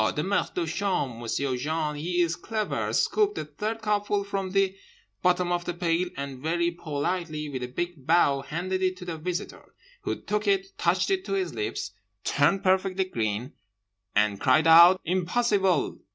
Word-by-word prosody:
The 150 Hz, -, 0 dB
maitre 200 Hz, +3 st, 0 dB
de 175 Hz, -, 0 dB
chambre—M'sieu' 140 Hz, -, -1 dB
Jean 150 Hz, +3 st, -2 dB
he 175 Hz, +4 st, -1 dB
is 165 Hz, -1 st, -1 dB
clever—scooped 225 Hz, -, 0 dB
the -, -, -4 dB
third 215 Hz, +10 st, -4 dB
cupful 205 Hz, -1 st, 0 dB
from 195 Hz, -1 st, -3 dB
the 195 Hz, 0 st, +1 dB, 0.5 s
bottom 180 Hz, -1 st, +2 dB
of 175 Hz, 0 st, -1 dB
the 175 Hz, -, -3 dB
pail, 175 Hz, 0 st, 0 dB
and 140 Hz, -2 st, -5 dB
very 170 Hz, +4 st, 0 dB
politely, 155 Hz, -1 st, -3 dB
with 130 Hz, -3 st, -5 dB
a 125 Hz, -, -3 dB
big 160 Hz, +1 st, -5 dB
bow, 150 Hz, -5 st, +4 dB
handed 175 Hz, +7 st, -3 dB
it 185 Hz, 0 st, 0 dB
to 180 Hz, -, -9 dB
the 165 Hz, -3 st, -5 dB
Visitor; 180 Hz, +4 st, -5 dB, 0.3 s
who -, -, -3 dB
took 210 Hz, 0 st, -2 dB
it, 195 Hz, -1 st, +1 dB
touched 180 Hz, -, +2 dB
it 380 Hz, -1 st, +1 dB
to -, -, -3 dB
his 380 Hz, -1 st, -1 dB
lips, 415 Hz, -, -3 dB, 0.3 s
turned 195 Hz, -, +2 dB
perfectly 190 Hz, 0 st, +2 dB
green, 115 Hz, -, -3 dB, 0.6 s
and 105 Hz, -1 st, +2 dB
cried 145 Hz, +4 st, +4 dB
out 170 Hz, +3 st, +8 dB
'Impossible! 190 Hz, 0 st, +1 dB
175 Hz, 165 wpm, -27 LUFS, 150-195 Hz, 0.6 s, out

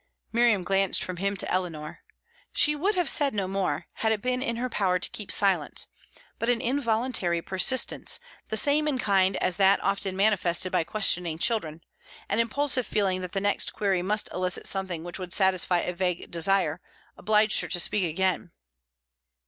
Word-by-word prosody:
Miriam 230 Hz, -5 st, +3 dB
glanced 195 Hz, +1 st, +1 dB
from 185 Hz, -1 st, -5 dB
him 200 Hz, +2 st, -1 dB
to -, -, -3 dB
Eleanor. 165 Hz, -5 st, -3 dB, 0.5 s
She 300 Hz, -1 st, +2 dB
would 385 Hz, +8 st, 0 dB
have 355 Hz, -2 st, +1 dB
said 280 Hz, -5 st, +3 dB
no 195 Hz, -2 st, -1 dB
more, 185 Hz, -5 st, -2 dB
had 220 Hz, -, +1 dB
it 220 Hz, -, 0 dB
been 250 Hz, +2 st, -1 dB
in 235 Hz, -3 st, -2 dB
her 245 Hz, +2 st, -2 dB
power 190 Hz, -6 st, 0 dB
to 180 Hz, -, 0 dB
keep 210 Hz, -, -5 dB
silence; 195 Hz, -1 st, +2 dB, 0.5 s
but 230 Hz, -, -1 dB
an 245 Hz, -1 st, +2 dB
involuntary 235 Hz, -8 st, 0 dB
persistence, 190 Hz, +8 st, 0 dB, 0.3 s
the 220 Hz, -, -2 dB
same 295 Hz, +5 st, +3 dB
in 285 Hz, -3 st, 0 dB
kind 195 Hz, -4 st, +2 dB
as 185 Hz, -, -1 dB
that 195 Hz, 0 st, +4 dB
often 195 Hz, -1 st, -1 dB
manifested 185 Hz, -3 st, +2 dB
by 180 Hz, -2 st, +2 dB
questioning 180 Hz, -6 st, +1 dB
children 165 Hz, -6 st, -1 dB, 0.5 s
an 205 Hz, -, 0 dB
impulsive 255 Hz, +2 st, +1 dB
feeling 190 Hz, -3 st, 0 dB
that 180 Hz, -1 st, -7 dB
the 195 Hz, -, 0 dB
next 205 Hz, 0 st, 0 dB
query 195 Hz, -3 st, 0 dB
must 210 Hz, +4 st, 0 dB
elicit 180 Hz, 0 st, -1 dB
something 190 Hz, -4 st, -3 dB
which 175 Hz, +2 st, -5 dB
would 180 Hz, -1 st, -5 dB
satisfy 185 Hz, -2 st, +2 dB
a 180 Hz, -, -3 dB
vague 180 Hz, -1 st, -2 dB
desire, 175 Hz, -1 st, +1 dB, 0.3 s
obliged 215 Hz, 0 st, +2 dB
her -, -, -5 dB
to 180 Hz, -, -1 dB
speak 200 Hz, +3 st, +1 dB
again. 180 Hz, +2 st, -1 dB
195 Hz, 175 wpm, -26 LUFS, 180-225 Hz, 0.5 s, that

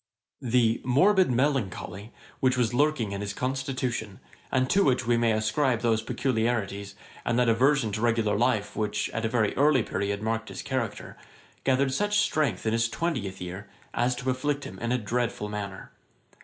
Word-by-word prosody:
] -, -, -54 dB
The 115 Hz, -2 st, +3 dB
'morbid 185 Hz, +9 st, +4 dB
melancholy,' 120 Hz, -6 st, -1 dB, 0.3 s
which 130 Hz, -1 st, +2 dB
was 120 Hz, -1 st, +1 dB
lurking 140 Hz, -6 st, +1 dB
in 100 Hz, 0 st, -4 dB
his 100 Hz, 0 st, -4 dB
constitution, 130 Hz, -5 st, -3 dB, 0.3 s
and 130 Hz, 0 st, +2 dB
to 200 Hz, +8 st, +3 dB
which 130 Hz, -2 st, +2 dB
we 120 Hz, 0 st, +3 dB
may 115 Hz, -1 st, +2 dB
ascribe 110 Hz, +3 st, +1 dB
those 115 Hz, -2 st, +2 dB
particularities, 110 Hz, -5 st, -1 dB, 0.3 s
and 120 Hz, -, 0 dB
that 125 Hz, -1 st, +3 dB
aversion 125 Hz, 0 st, +3 dB
to 105 Hz, -, -3 dB
regular 115 Hz, -3 st, +2 dB
life, 110 Hz, -2 st, +1 dB
which, 105 Hz, -1 st, -1 dB
at 115 Hz, 0 st, -2 dB
a -, -, +1 dB
very 110 Hz, -3 st, +1 dB
early 140 Hz, -3 st, +4 dB
period, 100 Hz, +1 st, -2 dB
marked 110 Hz, 0 st, -2 dB
his -, -, -7 dB
character, 130 Hz, -6 st, -4 dB, 0.5 s
gathered 135 Hz, 0 st, +2 dB
such 205 Hz, +6 st, +1 dB
strength 140 Hz, -, +1 dB
in 110 Hz, -, +1 dB
his 115 Hz, 0 st, +2 dB
twentieth 120 Hz, -, -3 dB
year, 95 Hz, +3 st, -7 dB, 0.2 s
as 125 Hz, +1 st, +1 dB
to 130 Hz, +1 st, -1 dB
afflict 145 Hz, +2 st, -1 dB
him 95 Hz, -, -8 dB
in 115 Hz, 0 st, -2 dB
a 125 Hz, -, +2 dB
dreadful 115 Hz, -1 st, -2 dB
manner. 100 Hz, -2 st, -6 dB
115 Hz, 175 wpm, -27 LUFS, 105-130 Hz, 0.5 s, morbid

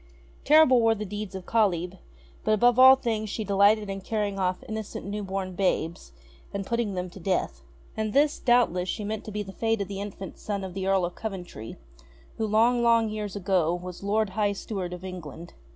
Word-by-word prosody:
Terrible 290 Hz, -5 st, +6 dB
were 225 Hz, 0 st, +4 dB
the 210 Hz, 0 st, -5 dB
deeds 205 Hz, -1 st, -6 dB
of 185 Hz, -2 st, -7 dB
Kalyb; 180 Hz, -6 st, 0 dB, 0.4 s
but 215 Hz, -, +2 dB
above 245 Hz, +3 st, +4 dB
all 260 Hz, +1 st, +10 dB
things 225 Hz, -5 st, -2 dB
she 220 Hz, -, -3 dB
delighted 205 Hz, +1 st, +3 dB
in 195 Hz, 0 st, -5 dB
carrying 205 Hz, -1 st, -2 dB
off 185 Hz, -1 st, -1 dB
innocent 220 Hz, -1 st, -5 dB
new 205 Hz, +1 st, -4 dB
born 190 Hz, -1 st, -4 dB
babes, 170 Hz, -, -1 dB, 0.4 s
and 200 Hz, -1 st, -4 dB
putting 235 Hz, -3 st, -1 dB
them 180 Hz, 0 st, -3 dB
to 195 Hz, -, -11 dB
death. 185 Hz, +1 st, -1 dB, 0.3 s
And 220 Hz, -1 st, -2 dB
this, 290 Hz, +5 st, +2 dB
doubtless, 230 Hz, -8 st, +2 dB
she 215 Hz, -, -3 dB
meant 215 Hz, +1 st, -4 dB
to 215 Hz, -, -7 dB
be 210 Hz, 0 st, -3 dB
the 195 Hz, -, -9 dB
fate 225 Hz, +1 st, 0 dB
of 200 Hz, -, -2 dB
the 200 Hz, 0 st, -5 dB
infant 195 Hz, -2 st, -7 dB
son 200 Hz, -2 st, -3 dB
of 190 Hz, -2 st, -6 dB
the 190 Hz, 0 st, -3 dB
Earl 195 Hz, -2 st, +3 dB
of 175 Hz, -, -5 dB
Coventry, 180 Hz, -, -7 dB, 0.6 s
who 220 Hz, -, 0 dB
long 230 Hz, +3 st, +3 dB
long 230 Hz, -1 st, +4 dB
years 210 Hz, -2 st, -5 dB
ago 180 Hz, -4 st, +1 dB
was 180 Hz, 0 st, -8 dB
Lord 210 Hz, +1 st, 0 dB
High 205 Hz, +1 st, +1 dB
Steward 195 Hz, -3 st, -5 dB
of 180 Hz, +1 st, -7 dB
England. 175 Hz, -2 st, -8 dB
200 Hz, 200 wpm, -26 LUFS, 185-220 Hz, 0.6 s, all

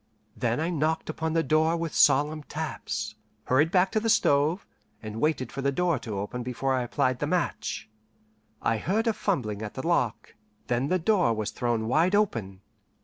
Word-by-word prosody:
Then -, -, 0 dB
I 165 Hz, +3 st, 0 dB
knocked 160 Hz, 0 st, 0 dB
upon 160 Hz, 0 st, -3 dB
the 165 Hz, 0 st, +2 dB
door 160 Hz, +3 st, +2 dB
with 165 Hz, -1 st, -3 dB
solemn 150 Hz, +3 st, +4 dB
taps, 145 Hz, -8 st, -4 dB, 0.3 s
hurried 145 Hz, +5 st, +3 dB
back 185 Hz, +1 st, +3 dB
to 215 Hz, -, +2 dB
the 225 Hz, +1 st, -1 dB
stove, 155 Hz, -2 st, +3 dB, 0.3 s
and 110 Hz, 0 st, -6 dB
waited 150 Hz, -6 st, 0 dB
for 135 Hz, -, -5 dB
the 140 Hz, +1 st, +1 dB
door 170 Hz, -1 st, +1 dB
to 110 Hz, -4 st, -5 dB
open 105 Hz, +5 st, -4 dB
before 125 Hz, +2 st, -1 dB
I 130 Hz, -, +1 dB
applied 125 Hz, +1 st, 0 dB
the -, -, -1 dB
match. -, -, -2 dB, 0.8 s
I 115 Hz, -, +2 dB
heard 210 Hz, -, 0 dB
a 225 Hz, -, +2 dB
fumbling 115 Hz, -, -2 dB
at 105 Hz, -1 st, -6 dB
the 130 Hz, -, -5 dB
lock, 125 Hz, -10 st, 0 dB, 0.3 s
then 120 Hz, +3 st, 0 dB
the 185 Hz, -, +2 dB
door 180 Hz, -, +2 dB
was 110 Hz, -1 st, -2 dB
thrown 120 Hz, -3 st, -1 dB
wide 165 Hz, -, +3 dB
open. 110 Hz, -, 0 dB
145 Hz, 185 wpm, -27 LUFS, 120-170 Hz, 0.8 s, solemn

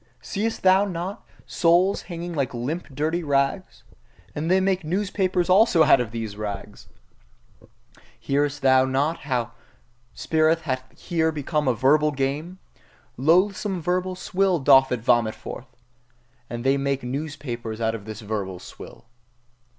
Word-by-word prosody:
Seest 220 Hz, +3 st, -3 dB
thou 190 Hz, +1 st, +5 dB
not 190 Hz, +2 st, -5 dB
the -, -, -30 dB
souls 180 Hz, +3 st, +2 dB
hanging 170 Hz, 0 st, -5 dB
like 140 Hz, -5 st, -2 dB
limp 145 Hz, +9 st, -4 dB
dirty 155 Hz, +5 st, -2 dB
rags? 140 Hz, +5 st, -1 dB, 0.5 s
And 155 Hz, +3 st, -3 dB
they 185 Hz, +1 st, +4 dB
make 190 Hz, -1 st, 0 dB
newspapers 185 Hz, +1 st, 0 dB
also 185 Hz, -3 st, +5 dB
out 130 Hz, -, +5 dB
of 120 Hz, -, -3 dB
these 110 Hz, -3 st, -5 dB
rags! 105 Hz, -1 st, -7 dB, 1.3 s
Hearest 145 Hz, 0 st, -1 dB
thou 130 Hz, -1 st, +5 dB
not 140 Hz, +5 st, 0 dB
how 125 Hz, -5 st, -2 dB, 0.6 s
spirit 160 Hz, +1 st, +1 dB
hath 130 Hz, -4 st, -4 dB
here 160 Hz, -2 st, 0 dB
become 150 Hz, -1 st, -2 dB
a 125 Hz, -, +2 dB
verbal 150 Hz, +6 st, +3 dB
game? 145 Hz, +7 st, -3 dB, 0.6 s
Loathsome 185 Hz, -, +2 dB
verbal 180 Hz, +2 st, -1 dB
swill 185 Hz, 0 st, 0 dB
doth 135 Hz, -2 st, +5 dB
it 125 Hz, -2 st, -1 dB
vomit 120 Hz, -2 st, +2 dB
forth! 130 Hz, -, -9 dB, 0.8 s
And 120 Hz, 0 st, -5 dB
they 135 Hz, +1 st, +3 dB
make 140 Hz, -1 st, -1 dB
newspapers 125 Hz, -4 st, -5 dB
also 115 Hz, -, 0 dB
out 110 Hz, -, 0 dB
of 110 Hz, -3 st, -7 dB
this 110 Hz, 0 st, -8 dB
verbal 100 Hz, -3 st, -4 dB
swill. -, -, -12 dB
145 Hz, 145 wpm, -24 LUFS, 130-175 Hz, 1.3 s, thou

